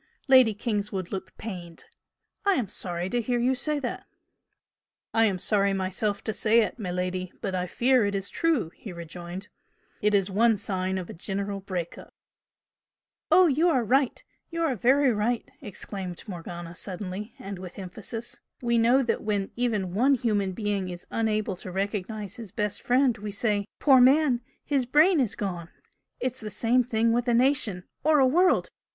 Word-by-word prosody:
Lady 255 -5 +6
Kingswood 205 -4 -3
looked 190 -1 -6
pained. 175 -6 -8 0.6
"I 400 - +4
am 230 -7 -1
sorry 175 -3 -2
to 245 - +1
hear 245 +2 0
you 245 +2 +2
say 300 +4 -1
that!" 250 - -5 1.1
"I 225 0 +4
am 195 -4 +1
sorry 200 +1 +2
myself 195 +2 -1
to 220 - -2
say 225 +2 +4
it, 220 - -3
miladi, 185 -1 -3
but 195 - -3
I 180 0 -1
fear 250 +5 +3
it 200 - -2
is 195 0 -2
true!" 315 - 0
he 205 - -9
rejoined 175 +4 -8 0.5
"It 210 0 +3
is 195 -1 +1
one 225 +2 +3
sign 190 -1 -2
of 180 -2 -4
a - - -8
general 200 +3 -3
break 185 -3 -5
up." - - -15 1.1
"Oh, 370 - +7
you 320 +3 +3
are 260 -7 +2
right! 260 +3 +1 0.3
You 335 0 -2
are 290 -6 +1
very 260 +4 +3
right!" 225 +3 -1
exclaimed 190 -3 -7
Morgana 175 -2 -7
suddenly, 190 +4 -5
and 195 -1 -7
with 180 -1 -9
emphasis 215 +5 -6 0.2
"We 235 -1 +1
know 245 +4 +4
that 235 - -1
when 205 -2 -1
even 215 -7 -1
one 260 +7 +4
human 210 -6 0
being 200 -2 -2
is 175 0 -8
unable 215 -3 0
to 185 - -8
recognise 205 +3 -3
his 225 -5 -9
best 210 -2 -2
friend 250 -1 +3
we 210 +1 -5
say 205 0 0
'Poor 265 -3 +6
man! 265 -1 +5 0.2
His 270 -4 0
brain 310 +6 +5
is 245 -6 +1
gone!' 175 -4 -4 0.5
It's 255 0 -2
the 215 - -5
same 240 +4 +2
thing 230 -1 +1
with 240 +1 0
a 240 - +3
nation. 240 -7 +2 0.2
Or 310 0 +4
a 270 - +5
world! 355 +8 +3
210 Hz, 175 wpm, -27 LUFS, 190-245 Hz, 1.1 s, Oh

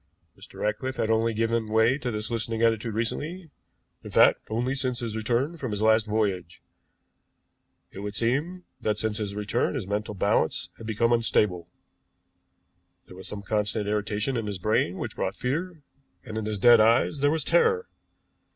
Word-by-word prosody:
Mr. - - -14
Ratcliffe 130 +5 -1
had 110 - 0
only 115 +1 +2
given 115 0 0
way 110 +5 +3
to 125 - -3
this 105 0 -3
listening 115 0 -2
attitude 115 -1 +1
recently; 155 +9 -3 0.5
in - - -8
fact, - - +5
only 120 +4 -1
since 130 -2 -2
his 115 -3 -4
return 120 +9 -1
from 130 -5 -4
his 105 0 -2
last 110 0 +4
voyage. 100 -5 -1 1.3
It - - -9
would 100 +1 -5
seem 150 - -1 0.2
that 105 -3 -1
since 110 0 -1
his 100 -2 -3
return 105 +7 -1
his 125 -8 -3
mental 105 +1 -3
balance 100 -4 0
had 115 - -8
become 115 +2 +2
unstable. 105 -7 +1 1.4
There 90 - -13
was 95 - -9
some 100 -1 -7
constant 105 +1 -1
irritation 105 +4 -1
in 115 -2 -3
his 100 -2 -3
brain 95 -2 0
which - - -5
brought - - -2
fear, 160 +5 -3 0.4
and 110 -4 -8
in 110 -1 -2
his 105 -1 -2
dead 120 +3 +7
eyes 115 +6 +3
there 145 +1 +3
was 160 +1 0
terror. 460 -1 +2
110 Hz, 170 wpm, -26 LUFS, 105-125 Hz, 1.4 s, dead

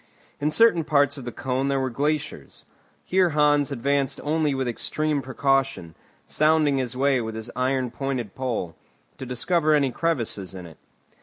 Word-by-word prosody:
In 150 - +1
certain 170 0 +4
parts 145 -2 +2
of 130 - -9
the 120 - -4
cone 130 +3 -2
there 140 -1 +1
were 130 -1 -1
glaciers. 145 +4 -3 0.4
Here 185 -1 +3
Hans 145 -1 +3
advanced 140 +1 0
only 150 -1 +1
with 130 -1 -1
extreme 150 +5 -1
precaution, 135 -9 0 0.3
sounding 155 -2 +2
his 125 -1 -3
way 135 -1 +2
with 110 -1 -5
his 110 +2 -6
iron 130 -1 0
pointed 130 -7 -3
pole, 115 -11 -3 0.4
to 130 - -6
discover 155 +5 +1
any 140 -3 +2
crevasses 115 - -2
in 90 -1 -8
it. 80 -2 -14
135 Hz, 160 wpm, -24 LUFS, 125-150 Hz, 0.4 s, certain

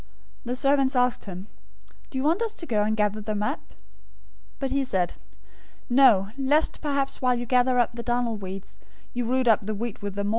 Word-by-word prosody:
"The 245 +1 -2
servants 275 0 +2
asked 250 -1 +1
him, 185 -1 -7 0.6
'Do 265 - -5
you 260 - -1
want 330 +8 +2
us 450 -1 -1
to 335 - -7
go 220 -8 +1
and 215 +1 0
gather 210 0 +1
them 210 0 -2
up?' 265 +8 -3
013:029 - - -23 0.8
"But 270 -1 -3
he 275 0 +1
said, 185 -9 -1 0.8
'No, 235 -7 +5
lest 290 +4 +2
perhaps 280 -2 -1
while 250 -1 +3
you 240 0 -3
gather 250 +1 +3
up 240 -1 +2
the 235 - -5
darnel 240 -1 0
weeds, 195 -1 -8 0.3
you 245 0 -2
root 255 +1 +1
up 215 -3 +3
the 215 - -2
wheat 230 +1 -5
with 200 -1 -5
them. 200 0 -1
245 Hz, 200 wpm, -25 LUFS, 210-265 Hz, 0.8 s, No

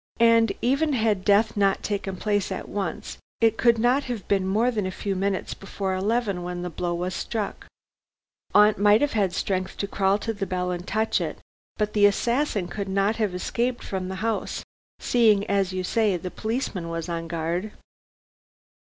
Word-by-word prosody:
"And 230 -1 +5
even 280 +5 +2
had 215 -6 +1
death 205 +2 +3
not 195 -1 +2
taken 200 -2 -2
place 205 0 0
at 190 - -4
once, 195 -4 -4 0.2
it 225 -1 +4
could 235 0 +4
not 245 +5 +2
have 240 -6 -5
been 195 -2 +1
more 220 +6 +2
than 210 -5 -1
a - - -3
few 195 +1 -3
minutes 195 0 -1
before 195 -1 -4
eleven 200 0 0
when 175 0 -4
the 180 - -4
blow 175 +1 -2
was 180 +2 -3
struck. 215 +1 -4 0.9
Aunt 210 0 +6
might 205 +1 +5
have 290 - +2
had 200 -4 +1
strength 185 0 -2
to - - -1
crawl 195 0 +2
to 225 +2 -3
the 200 -2 -4
bell 180 0 -1
and 180 0 -5
touch 220 +1 +1
it, - - -3 0.4
but 210 -1 -1
the 205 -1 +6
assassin 235 -1 0
could 200 0 -5
not 195 +3 +1
have 210 -5 0
escaped 240 +6 -1
from 190 -1 -4
the 190 - -4
house, 225 -2 -2 0.3
seeing 215 -4 +3
as 195 -2 +1
you 185 0 -3
say 210 0 +1
the 180 +1 -6
policeman 220 -6 -3
was 165 0 -4
on 165 -1 -3
guard." 170 +5 -2
200 Hz, 185 wpm, -25 LUFS, 185-225 Hz, 0.9 s, Aunt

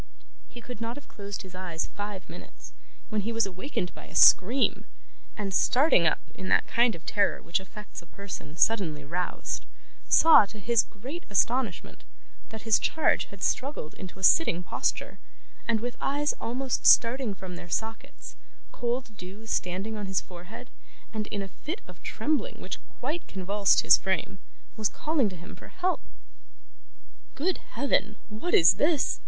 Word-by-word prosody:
He 240 - -11
could 245 -2 -9
not 230 +1 -3
have 290 - -11
closed 200 -1 -7
his 185 -1 -12
eyes 180 -3 -4
five 205 -2 -5
minutes, - - -12 0.4
when 215 -2 0
he 225 +4 -3
was 230 -1 +2
awakened 190 0 -4
by - - -12
a - - -14
scream, 240 +9 +5 0.5
and 200 -2 -3
starting 250 - +4
up 155 - +2 0.2
in 190 - -6
that - - +4
kind 235 -1 +2
of 165 - -13
terror 205 -1 +1
which 170 +4 -1
affects 195 +1 -10
a 170 - -18
person 175 -5 -8
suddenly 170 -11 +1
roused, 175 +4 -3 0.5
saw, 320 -10 +7
to 215 - -11
his 230 +2 +3
great 265 - -8
astonishment, 225 0 0 0.5
that 220 -2 -8
his 225 -2 +4
charge 320 - +1
had 200 -1 -11
struggled 260 - -1
into 185 0 -9
a 190 - -12
sitting 180 - +4
posture, - - -2 0.5
and 230 -1 +2
with 245 0 -4
eyes 290 +2 +1
almost 255 +2 -1
starting 235 -2 +5
from 185 -1 -8
their 175 - -10
sockets, 225 +6 -5 0.4
cold 240 -1 -3
dew 195 +5 -10
standing 200 +1 -2
on 205 -2 -4
his 190 0 +1
forehead, 180 +4 -11 0.4
and 215 -1 -3
in 200 -1 -3
a - - -6
fit 335 - -7
of - - -14
trembling 310 +11 -2
which - - -6 0.2
quite 300 +7 -3
convulsed 195 +1 +2
his - - +7
frame, 190 0 -2 0.4
was 215 -1 +1
calling 300 -8 0
to 185 - -9
him 180 +4 -11
for - - -13
help. 370 0 -1 1.3
'Good 350 +5 0 0.2
Heaven, 240 -4 +1
what 220 +12 -1
is 165 - +7
this? 300 -1 +2
210 Hz, 165 wpm, -28 LUFS, 190-250 Hz, 1.3 s, saw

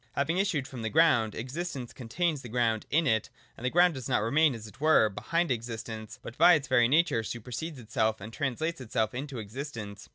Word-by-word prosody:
Having 160 +6 0
issued 160 -9 0
from 130 -4 -8
the 110 - -2
ground, 130 -9 +3
existence 130 +1 -5
contains 150 +5 -2
the 125 - -9
ground 115 -2 0
in 165 +2 +2
it: 110 -5 +1 0.3
the 125 +2 -2
ground 175 +4 +4
does 130 -4 -6
not - - +2
remain, 145 +4 +3
as 110 -2 -9
it 105 +5 -14
were, 155 -8 +5
behind 165 - -1
existence, 110 -2 -5
but 115 - -8
by 180 - +8
its 140 -3 -2
very 120 -3 +4
nature 145 -3 +3
supersedes 125 +8 -6
itself 110 -1 -1
and 110 +3 -9
translates 155 +4 -2
itself 110 -2 -1
into 135 +1 -5
existence. 110 -2 -7
125 Hz, 195 wpm, -29 LUFS, 110-155 Hz, 0.3 s, by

